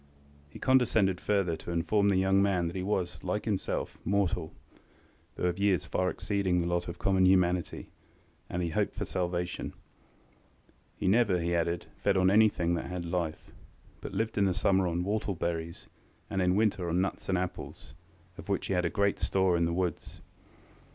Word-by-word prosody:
He - - -11
condescended 110 -8 +2
further 100 -5 +1
to 80 - -9
inform 100 +5 +2
the 100 - +3
young 95 +1 +3
man 95 -3 +2
that 85 - -4
he 95 - -2
was, 90 -2 -2
like 95 +3 -2
himself, 105 -4 -2
mortal, 90 -4 0 0.8
though - - -6
of 90 +1 0
years 100 -3 +2
far 90 0 0
exceeding 95 -3 0
the 85 - 0
lot 85 0 -1
of 85 0 -6
common 95 0 +3
humanity, 90 -2 +1 0.6
and 90 - -2
that - - 0
he 85 - -3
hoped - - -1
for - - -3
salvation. 90 -1 -3 1.2
He - - -2
never, 100 -2 +3
he 85 +1 -1
added, 85 0 -1
fed 100 -1 +1
on 95 0 +4
anything 100 -5 +3
that 85 - -2
had 90 -1 -4
life, 85 -2 -3 0.5
but - - -6
lived 110 +1 -1
in 100 - +4
the 95 -2 +1
summer 95 -1 +2
on 85 +1 -1
whortle 100 0 -1
berries, 85 0 -4 0.4
and 95 - 0
in 90 0 +2
winter 100 -4 +1
on 85 +2 +1
nuts 95 +1 -2
and 95 - +2
apples, 90 -4 -6 0.5
of - - -10
which 100 - 0
he - - -1
had 90 -1 +1
great 100 -1 +1
store 95 -2 +2
in 85 0 +2
the 85 - 0
woods. 90 0 -3
90 Hz, 185 wpm, -30 LUFS, 85-100 Hz, 1.2 s, on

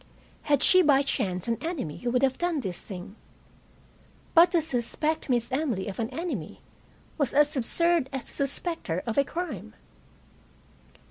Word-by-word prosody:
Had 285 -2 +3
she 370 - +7
by 285 -4 +4
chance 185 -8 -2
an 230 -1 -1
enemy 305 - -4
who 245 - -3
would 250 +2 +1
have 265 -1 +1
done 345 -3 0
this 185 -6 -5
thing? 190 +1 -9 1.2
But 340 +1 +7
to 345 - +5
suspect 300 +2 -2
Miss 240 -1 +1
Emily 255 -9 -1
of 195 - -6
an 225 0 -1
enemy 260 - -5 0.6
was 275 -3 0
as 295 +1 +4
absurd 330 +3 +2
as 265 -2 -4
to - - -5
suspect 320 +5 -1
her 170 +1 -2
of 230 +2 0
a - - +5
crime. 280 - -6
265 Hz, 160 wpm, -27 LUFS, 225-320 Hz, 1.2 s, she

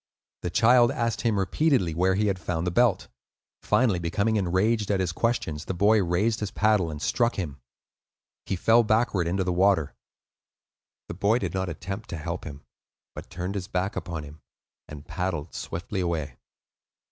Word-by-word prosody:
The 90 - -2
child 120 +4 +5
asked 115 -3 -1
him 115 -4 +1
repeatedly 95 - +1
where 95 +3 +2
he 105 +2 +1
had 100 -3 0
found 85 -1 -2
the 90 - 0
belt; 110 -1 +2 0.5
finally 110 -8 +2
becoming 100 +6 0
enraged 105 +3 +1
at 100 -2 +1
his 90 -3 0
questions, 85 -7 -1
the 95 - -3
boy 105 +4 +4
raised 100 +6 +1
his 105 - -3
paddle 105 -6 +2
and 75 -1 -6
struck 120 - +1
him. 75 -7 -5 0.9
He - - -1
fell 115 +6 +4
backward 110 -5 +1
into 95 +2 0
the 90 -1 -1
water. 90 -4 +2 1.1
The - - -6
boy 100 +6 +2
did 125 - -3
not 95 -1 -2
attempt 95 +6 -6
to 85 - -4
help 85 +2 -5
him, 75 -2 -9 0.5
but - - -9
turned 90 +2 -4
his 95 -2 -4
back 95 0 -2
upon 80 -4 -4
him, 75 +1 -12 0.5
and 75 -1 -10
paddled 85 -1 -3
swiftly 95 +4 -5
away. 80 -7 -2
95 Hz, 170 wpm, -26 LUFS, 85-110 Hz, 1.1 s, child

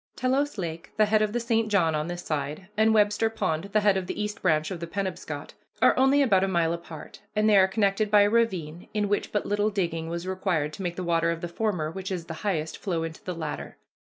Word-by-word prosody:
Telos 265 +1 0
Lake, 165 -3 -5
the 215 - +5
head 215 +1 +3
of 215 -1 +1
the 240 - -1
St. 225 -1 +1
John 175 -6 +3
on 150 +1 -1
this 175 0 -5
side, 150 +5 -4
and 220 +1 +4
Webster 210 +1 +3
Pond, 160 -6 -2
the 210 +1 +1
head 205 -2 +4
of 185 -1 -3
the - - -4
East 210 +1 -3
Branch 155 -2 +1
of 180 - -4
the 170 - -5
Penobscot, 190 +1 -4 0.3
are - - +5
only 270 +2 +4
about 195 -7 +3
a - - +2
mile 170 -3 +1
apart, 170 -2 -9
and 215 +1 +3
they 215 - +5
are 190 -1 +6
connected 200 +1 +1
by 205 0 +6
a 205 - +4
ravine, 185 -8 0
in 210 -1 +1
which 205 0 -1
but 210 - -1
little 205 +1 +1
digging 170 -5 -2
was 170 +1 -4
required 185 -5 -1
to 195 - -7
make 175 -2 -2
the 185 - -4
water 165 -1 +1
of 170 0 -2
the 175 - -3
former, 170 -4 -2
which 190 +2 -6
is 175 -3 -3
the 165 - -6
highest, 165 -7 -2
flow 170 -5 -2
into 165 -1 -7
the 180 - -4
latter. 160 -2 -5
190 Hz, 245 wpm, -26 LUFS, 165-210 Hz, 0.3 s, are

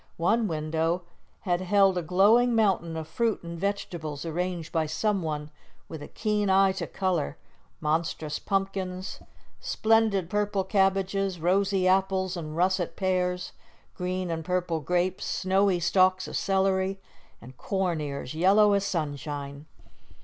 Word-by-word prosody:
One 220 +7 +2
window 160 +2 -1 0.4
had 175 -2 0
held 195 0 +3
a 180 - 0
glowing 210 +8 +4
mountain 185 -7 +1
of 160 -1 -5
fruit 225 +5 -1
and 170 0 -6
vegetables 170 -6 -3
arranged 175 0 -3
by 160 -2 0
someone 155 -4 -2 0.4
with 160 -2 -8
a - - -7
keen 210 -2 -1
eye 195 0 +5
to 190 -2 -4
colour 185 - -1 0.4
monstrous 155 -1 -1
pumpkins, 195 -1 -3 0.4
splendid 220 -5 +2
purple 205 0 0
cabbages, 195 -1 +1
rosy 190 +2 +2
apples 190 0 +1
and 155 -2 -6
russet 185 0 +1
pears, 180 -1 -1 0.4
green 180 0 -3
and 165 -1 -3
purple 180 -1 -1
grapes, 180 +5 -1
snowy 190 -1 +1
stalks 185 +2 +3
of - - -6
celery, 190 0 +1 0.4
and 125 +2 -13
corn 185 -5 -1
ears 140 -2 -5
yellow 200 +5 +4
as 200 -1 +2
sunshine. 145 -4 -4
185 Hz, 130 wpm, -27 LUFS, 165-195 Hz, 0.4 s, eye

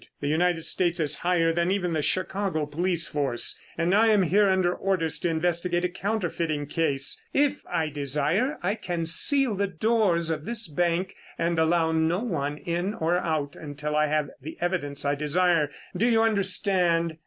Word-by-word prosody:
The 145 - -3
United 165 +2 +1
States 175 +1 0
is 150 -3 0
higher 170 -2 +1
than 170 +1 +1
even 185 -3 0
the 155 - 0
Chicago 185 -1 -1
police 170 +3 -1
force, 140 -5 -1 0.2
and 170 +2 +1
I 220 +3 +5
am 210 -3 +4
here 195 +4 +3
under 185 -2 +2
orders 180 -6 -1
to 175 - -1
investigate 175 +2 0
a - - 0
counterfeiting 175 -6 -2
case. 145 -3 0
If 290 0 +2
I 165 -3 0
desire, 150 - 0
I 190 +3 +1
can 175 -6 -3
seal 265 - +3
the 200 0 0
doors 185 -3 +1
of 155 -2 -3
this 230 -1 -3
bank 175 +4 -1 0.2
and 170 0 0
allow 160 0 +2
no 160 +2 +1
one 150 - -2
in 175 +6 -3
or 175 -1 +1
out 155 -5 -2
until 150 0 -5
I 150 0 +3
have 150 -1 -1
the 155 +5 -8
evidence 170 -6 -2
I 140 - +2
desire. 155 +1 +1 0.3
Do 215 +7 +2
you 225 -2 +3
understand?" 185 -5 +1
170 Hz, 175 wpm, -26 LUFS, 155-190 Hz, 0.3 s, I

